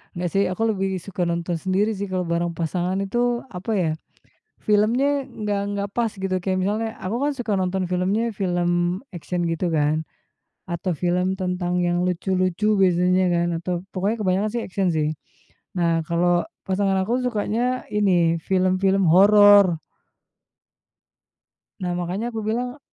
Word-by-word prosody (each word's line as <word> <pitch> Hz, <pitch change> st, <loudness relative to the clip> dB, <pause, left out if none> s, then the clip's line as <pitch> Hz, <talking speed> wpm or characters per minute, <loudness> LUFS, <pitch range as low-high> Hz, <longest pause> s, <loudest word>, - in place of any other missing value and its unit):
Nggak 175 Hz, 0 st, -2 dB
sih 195 Hz, -, +3 dB
aku 185 Hz, -, -5 dB
lebih 195 Hz, -2 st, -1 dB
suka 185 Hz, 0 st, -4 dB
nonton 170 Hz, +1 st, -2 dB
sendiri 195 Hz, +5 st, +1 dB
sih 200 Hz, +1 st, -4 dB
kalau 185 Hz, -1 st, -1 dB
bareng 170 Hz, +1 st, 0 dB
pasangan 175 Hz, +3 st, -1 dB
itu, 240 Hz, +4 st, 0 dB
apa 190 Hz, +4 st, -5 dB
ya 175 Hz, -5 st, +1 dB, 0.7 s
filmnya 245 Hz, +7 st, +2 dB
nggak 210 Hz, -5 st, -3 dB
nggak 200 Hz, 0 st, -2 dB
pas 235 Hz, -2 st, +1 dB
gitu 190 Hz, -1 st, -2 dB
kayak 185 Hz, 0 st, 0 dB
misalnya 215 Hz, +4 st, -1 dB
aku 190 Hz, +5 st, -3 dB
kan 295 Hz, -, +1 dB
suka 235 Hz, -6 st, -2 dB
nonton 185 Hz, 0 st, -1 dB
filmnya 190 Hz, +6 st, 0 dB
film 175 Hz, -1 st, 0 dB
action 175 Hz, +1 st, -3 dB
gitu 165 Hz, +1 st, -1 dB
kan, 155 Hz, 0 st, +1 dB, 0.7 s
atau 175 Hz, +2 st, -2 dB
film 180 Hz, +2 st, 0 dB
tentang 180 Hz, -1 st, -2 dB
yang 175 Hz, 0 st, +1 dB
lucu-lucu 185 Hz, +3 st, 0 dB
biasanya 180 Hz, 0 st, +3 dB
kan 170 Hz, 0 st, +1 dB
atau 180 Hz, +2 st, -3 dB, 0.2 s
pokoknya 200 Hz, +4 st, -1 dB
kebanyakan 195 Hz, +2 st, +1 dB
sih 240 Hz, -, -1 dB
action 190 Hz, 0 st, -1 dB
sih. 155 Hz, -1 st, +1 dB, 0.7 s
Nah 165 Hz, -1 st, +2 dB
kalau 175 Hz, +1 st, +2 dB, 0.2 s
pasangan 195 Hz, 0 st, +1 dB
aku 240 Hz, +6 st, -1 dB
sukanya 245 Hz, +1 st, -1 dB
ini 175 Hz, -5 st, +2 dB
film-film 190 Hz, +1 st, +2 dB
horor. 200 Hz, 0 st, +6 dB, 2.0 s
Nah, 180 Hz, -, -1 dB
makannya 180 Hz, +6 st, -3 dB
aku 225 Hz, -2 st, -4 dB
bilang 245 Hz, +4 st, -2 dB
185 Hz, 145 wpm, -23 LUFS, 175-210 Hz, 2.0 s, horor